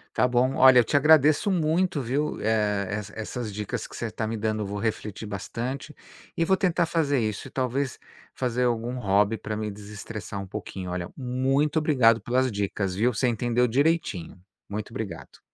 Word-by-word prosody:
Tá 125 Hz, -, +4 dB
bom. 125 Hz, +2 st, +2 dB
Olha, 130 Hz, -1 st, +8 dB
eu -, -, +6 dB
te 130 Hz, +6 st, +2 dB
agradeço 150 Hz, +4 st, +5 dB
muito, 170 Hz, -2 st, +1 dB
viu, 135 Hz, +5 st, -1 dB
eh, 105 Hz, -2 st, +1 dB
essa 105 Hz, 0 st, -4 dB
essas 110 Hz, 0 st, -5 dB
dicas 105 Hz, 0 st, -4 dB
que -, -, -12 dB
você -, -, -4 dB
tá 110 Hz, -, -3 dB
me 115 Hz, -, -2 dB
dando. 110 Hz, -1 st, -1 dB
Vou 100 Hz, +1 st, -4 dB
refletir 110 Hz, 0 st, -3 dB
bastante 120 Hz, +8 st, -5 dB, 0.4 s
e 165 Hz, -, +1 dB
vou 190 Hz, +3 st, +3 dB
tentar 180 Hz, -2 st, +2 dB
fazer 160 Hz, -4 st, +1 dB
isso 110 Hz, -2 st, -3 dB
e, -, -, -13 dB
talvez, 130 Hz, 0 st, -1 dB, 0.4 s
fazer 125 Hz, -1 st, 0 dB
algum 120 Hz, +1 st, -1 dB
hobby 105 Hz, +1 st, +2 dB
pra 110 Hz, -, -5 dB
me 105 Hz, 0 st, -3 dB
desestressar 105 Hz, 0 st, -7 dB
um 95 Hz, -, -8 dB
pouquinho. 95 Hz, -2 st, -6 dB
Olha, 90 Hz, -1 st, -3 dB
muito 135 Hz, +4 st, +1 dB
obrigado 125 Hz, -8 st, +4 dB
pelas 130 Hz, +2 st, +1 dB
dicas, 100 Hz, -2 st, -2 dB
viu. 115 Hz, +6 st, +1 dB
Você 120 Hz, +4 st, +1 dB
entendeu 120 Hz, +1 st, +1 dB
direitinho. 135 Hz, -, 0 dB, 0.3 s
Muito 105 Hz, +1 st, -5 dB
obrigado. 110 Hz, -9 st, -7 dB
115 Hz, 180 wpm, -26 LUFS, 105-135 Hz, 0.4 s, Olha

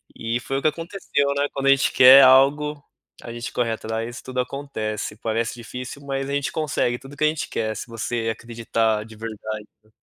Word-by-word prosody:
E 115 Hz, +1 st, -2 dB
foi 135 Hz, +3 st, -3 dB
o -, -, -8 dB
que -, -, +2 dB
aconteceu, 165 Hz, -4 st, -1 dB
né, 145 Hz, 0 st, +1 dB
quando 135 Hz, 0 st, -3 dB
a -, -, +6 dB
gente 135 Hz, -, +3 dB
quer 130 Hz, +2 st, +9 dB
algo, 145 Hz, +3 st, +4 dB, 0.4 s
a 115 Hz, -, -7 dB
gente 120 Hz, 0 st, -6 dB
corre 120 Hz, -2 st, 0 dB
atrás, 115 Hz, +2 st, -4 dB
tudo 130 Hz, 0 st, -5 dB
acontece, 125 Hz, -6 st, -4 dB
parece 115 Hz, +1 st, -2 dB
difícil 125 Hz, +4 st, -8 dB
mas 135 Hz, 0 st, -3 dB
a -, -, -2 dB
gente 140 Hz, -1 st, -1 dB
consegue 135 Hz, -6 st, -1 dB
tudo 135 Hz, +2 st, -13 dB
que -, -, -1 dB
a -, -, +6 dB
gente 155 Hz, 0 st, -2 dB
quer, 110 Hz, -1 st, -2 dB
se -, -, -6 dB
você 115 Hz, 0 st, -3 dB
acreditar 115 Hz, -2 st, -1 dB
de 110 Hz, -1 st, -13 dB
verdade, 110 Hz, -1 st, -6 dB, 0.2 s
né. 110 Hz, -, -28 dB
125 Hz, 205 wpm, -23 LUFS, 115-140 Hz, 0.4 s, quer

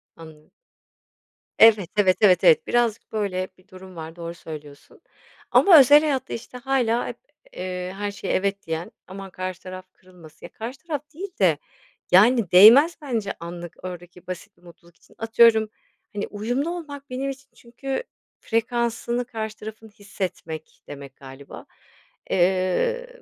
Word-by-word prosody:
Anladım. 160 Hz, -2 st, -15 dB, 1.1 s
Evet, 215 Hz, -6 st, +6 dB
evet, 185 Hz, -3 st, +4 dB
evet, 185 Hz, -4 st, +5 dB
evet. 475 Hz, -1 st, +5 dB
Birazcık 235 Hz, -3 st, 0 dB
böyle 190 Hz, -4 st, -2 dB
bir 185 Hz, -, -25 dB
durum 185 Hz, -2 st, -13 dB
var, 160 Hz, 0 st, -8 dB
doğru 170 Hz, -1 st, -7 dB
söylüyorsun. 150 Hz, -4 st, -12 dB, 0.5 s
Ama 355 Hz, -6 st, +8 dB
özel 285 Hz, +3 st, +7 dB
hayatta, 285 Hz, -4 st, -2 dB
işte, 245 Hz, +2 st, -8 dB
hâlâ 245 Hz, -3 st, 0 dB
hep, -, -, -7 dB, 0.4 s
eee, 180 Hz, 0 st, -5 dB
her 205 Hz, 0 st, -3 dB
şeye 200 Hz, -1 st, -4 dB
"evet" 200 Hz, 0 st, -1 dB
diyen, 160 Hz, +1 st, -4 dB, 0.2 s
aman 195 Hz, +1 st, -9 dB
karşı 185 Hz, 0 st, -6 dB
taraf 185 Hz, 0 st, -8 dB
kırılmasın 175 Hz, -3 st, -16 dB
Ya, -, -, -11 dB
karşı 235 Hz, +4 st, -7 dB
taraf 295 Hz, -3 st, -2 dB
değil 380 Hz, +6 st, -6 dB
de 170 Hz, -7 st, +4 dB, 0.5 s
yani 215 Hz, +1 st, +5 dB
değmez 235 Hz, -, +8 dB
bence 230 Hz, -8 st, -3 dB
anlık 170 Hz, 0 st, -8 dB
oradaki 175 Hz, 0 st, -9 dB
basit 185 Hz, +1 st, -8 dB
bir -, -, -28 dB
mutluluk 170 Hz, 0 st, -18 dB
için. -, -, -25 dB
Atıyorum, 225 Hz, -1 st, +4 dB, 0.4 s
hani, 205 Hz, 0 st, -3 dB
uyumlu 245 Hz, +9 st, -2 dB
olmak 290 Hz, -6 st, -7 dB
benim 265 Hz, +2 st, -3 dB
için 275 Hz, 0 st, -9 dB
çünkü 265 Hz, -, -5 dB, 0.4 s
"frekansını 235 Hz, +1 st, -1 dB
karşı 220 Hz, -2 st, -6 dB
tarafın 220 Hz, +1 st, -10 dB
hissetmek" 190 Hz, -7 st, -7 dB
demek 140 Hz, -2 st, -10 dB
galiba. 135 Hz, +1 st, -12 dB, 0.6 s
Eee, 190 Hz, -, +1 dB
205 Hz, 140 wpm, -23 LUFS, 180-240 Hz, 1.1 s, Ama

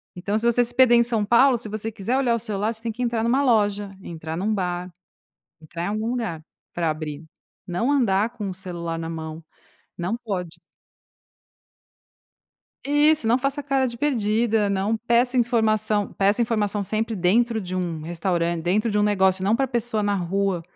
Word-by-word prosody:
Então, 200 Hz, +4 st, -2 dB
se 235 Hz, -, -3 dB
você 245 Hz, +1 st, +3 dB
se 240 Hz, 0 st, -3 dB
perder 255 Hz, -1 st, +6 dB
em 235 Hz, -, +5 dB
São 230 Hz, -3 st, 0 dB
Paulo, 240 Hz, +4 st, +5 dB
se 220 Hz, -, -7 dB
você 215 Hz, +1 st, -3 dB
quiser 220 Hz, +5 st, -1 dB
olhar 255 Hz, -3 st, +2 dB
o 230 Hz, -, -2 dB
celular, 215 Hz, 0 st, -1 dB
você 225 Hz, -, -10 dB
tem 230 Hz, 0 st, -3 dB
que 240 Hz, +3 st, -4 dB
entrar 235 Hz, -2 st, 0 dB
numa 255 Hz, +4 st, +2 dB
loja, 205 Hz, -5 st, +1 dB
entrar 160 Hz, -2 st, -6 dB
num 200 Hz, +6 st, -1 dB
bar, 180 Hz, -2 st, -3 dB, 0.7 s
entrar 165 Hz, +2 st, -7 dB
em -, -, -2 dB
algum 215 Hz, +2 st, -2 dB
lugar, 225 Hz, -10 st, -3 dB, 0.3 s
pra 170 Hz, -2 st, 0 dB
abrir. 155 Hz, -1 st, -5 dB, 0.4 s
Não 210 Hz, +10 st, 0 dB
andar 225 Hz, -5 st, +2 dB
com 205 Hz, -5 st, -5 dB
o -, -, -4 dB
celular 170 Hz, -3 st, -5 dB
na 165 Hz, 0 st, -4 dB
mão. 160 Hz, 0 st, -6 dB, 0.5 s
Não 180 Hz, +6 st, -2 dB
pode. 190 Hz, -8 st, -5 dB, 2.3 s
Isso. 295 Hz, -1 st, +3 dB
Não 230 Hz, +2 st, +4 dB
faça 275 Hz, +2 st, -2 dB
cara 270 Hz, -2 st, +1 dB
de 235 Hz, -1 st, -5 dB
perdida. 225 Hz, -5 st, +1 dB
Não 200 Hz, +3 st, 0 dB
peça 235 Hz, +3 st, +1 dB
informação. 215 Hz, -3 st, +1 dB
Peça 200 Hz, +3 st, +2 dB
informação 210 Hz, -3 st, 0 dB
sempre 220 Hz, +3 st, -1 dB
dentro 220 Hz, +5 st, +2 dB
de 185 Hz, -2 st, -5 dB
um 170 Hz, -3 st, -3 dB
restauran 170 Hz, +1 st, -1 dB
dentro 195 Hz, +7 st, 0 dB
de 210 Hz, -, 0 dB
um -, -, +3 dB
negócio, 190 Hz, -2 st, +2 dB
não 205 Hz, +3 st, +3 dB
pra 270 Hz, -, +1 dB
pessoa 235 Hz, -3 st, -1 dB
na 205 Hz, 0 st, +1 dB
rua. 190 Hz, 0 st, -1 dB
210 Hz, 180 wpm, -23 LUFS, 185-235 Hz, 2.3 s, perder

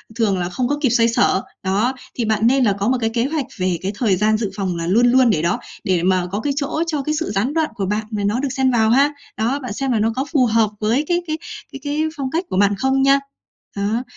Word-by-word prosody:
thường 215 Hz, -5 st, +1 dB
là 175 Hz, 0 st, -2 dB
không 245 Hz, +7 st, -1 dB
có 290 Hz, +3 st, 0 dB
kịp 270 Hz, -, +3 dB
xoay 230 Hz, 0 st, +3 dB
xở. 210 Hz, -4 st, +2 dB, 0.2 s
Đó, 205 Hz, +7 st, +1 dB, 0.2 s
thì 240 Hz, -, -1 dB
bạn 220 Hz, +1 st, +2 dB
nên 265 Hz, +2 st, +3 dB
là 205 Hz, -4 st, +3 dB
có 200 Hz, +3 st, -1 dB
một 260 Hz, -, +2 dB
cái 225 Hz, -, +1 dB
kế 230 Hz, +1 st, 0 dB
hoạch 295 Hz, -1 st, -2 dB
về 185 Hz, -2 st, 0 dB
cái 190 Hz, -, -2 dB
thời 210 Hz, -3 st, +2 dB
gian 215 Hz, +3 st, +2 dB
dự 215 Hz, -3 st, -3 dB
phòng 190 Hz, -3 st, -2 dB
là 170 Hz, 0 st, -3 dB
luôn 230 Hz, +6 st, +4 dB
luôn 255 Hz, -1 st, +5 dB
để 165 Hz, -8 st, +2 dB
đó, 170 Hz, +1 st, 0 dB, 0.2 s
để 180 Hz, -3 st, +1 dB
mà 185 Hz, -1 st, +2 dB
có 205 Hz, -, -2 dB
cái 280 Hz, +5 st, -1 dB
chỗ 300 Hz, +3 st, -1 dB
cho 300 Hz, -3 st, -1 dB
cái 305 Hz, +2 st, -1 dB
sự 330 Hz, -, -3 dB
gián 210 Hz, +8 st, 0 dB
đoạn 320 Hz, -1 st, +1 dB
của 200 Hz, -4 st, -2 dB
bạn 210 Hz, +3 st, -1 dB
mà 210 Hz, -2 st, -2 dB
nó 210 Hz, +4 st, 0 dB
được 275 Hz, 0 st, -1 dB
xen 265 Hz, 0 st, +1 dB
vào 220 Hz, -3 st, +3 dB
ha. 275 Hz, +5 st, +4 dB, 0.3 s
Đó, 240 Hz, +6 st, 0 dB
bạn 255 Hz, -6 st, -6 dB
xem 270 Hz, +4 st, -2 dB
là 225 Hz, -, +1 dB
nó 225 Hz, +1 st, +1 dB
có 265 Hz, -, -1 dB
phù 265 Hz, -5 st, +4 dB
hợp 225 Hz, -2 st, +2 dB
với 230 Hz, +8 st, +1 dB
cái 350 Hz, 0 st, +1 dB
cái 310 Hz, 0 st, -2 dB, 0.3 s
cái 275 Hz, -, -8 dB
cái 295 Hz, +1 st, -1 dB, 0.2 s
phong 265 Hz, -2 st, -3 dB
cách 335 Hz, +4 st, -1 dB
của 185 Hz, -, -2 dB
bạn 205 Hz, +1 st, +3 dB
không 265 Hz, +4 st, +1 dB
nha. 275 Hz, +1 st, +5 dB, 0.6 s
Đó, 210 Hz, +5 st, -1 dB
230 Hz, 280 wpm, -20 LUFS, 205-270 Hz, 0.6 s, luôn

